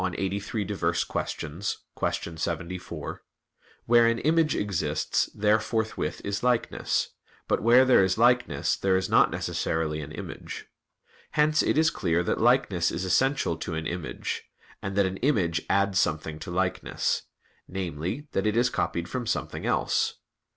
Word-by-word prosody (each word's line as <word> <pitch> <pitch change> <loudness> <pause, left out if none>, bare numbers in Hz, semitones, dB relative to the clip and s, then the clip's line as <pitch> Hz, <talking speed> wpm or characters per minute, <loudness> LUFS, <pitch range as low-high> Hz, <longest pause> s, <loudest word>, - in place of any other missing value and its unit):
83, 100 +3 -2
qu. 85 0 -2 0.3
74): 85 0 -4 0.6
"Where 120 0 +6
an 115 0 +2
image 160 +3 +2
exists, 100 -4 0
there 105 +1 +3
forthwith 110 -7 -2
is 100 0 -2
likeness; 125 -1 0 0.4
but - - +1
where 120 +4 +6
there 125 -6 +6
is 95 +1 +1
likeness, 120 - +3
there 95 -1 +2
is 95 - -2
not - - +6
necessarily 80 -1 -2
an 70 - -8
image." - - -7 0.7
Hence 155 +1 +3
it - - +1
is 160 +1 +4
clear 85 - 0
that - - -1
likeness 115 -8 +3
is 95 - -3
essential 130 - +2
to 80 0 -4
an 80 0 -3
image; 85 -3 -4 0.4
and 95 0 -4
that 100 -1 +4
an 95 0 -2
image 95 - +1
adds 100 -1 +2
something 80 0 -1
to 80 - -7
likeness 90 +1 0 0.5
namely, 95 - -4
that 95 - 0
it 105 +1 +1
is 125 +1 +3
copied 85 0 -1
from 125 -3 -4
something - - -2
else. - - +1
95 Hz, 145 wpm, -27 LUFS, 85-120 Hz, 0.7 s, Where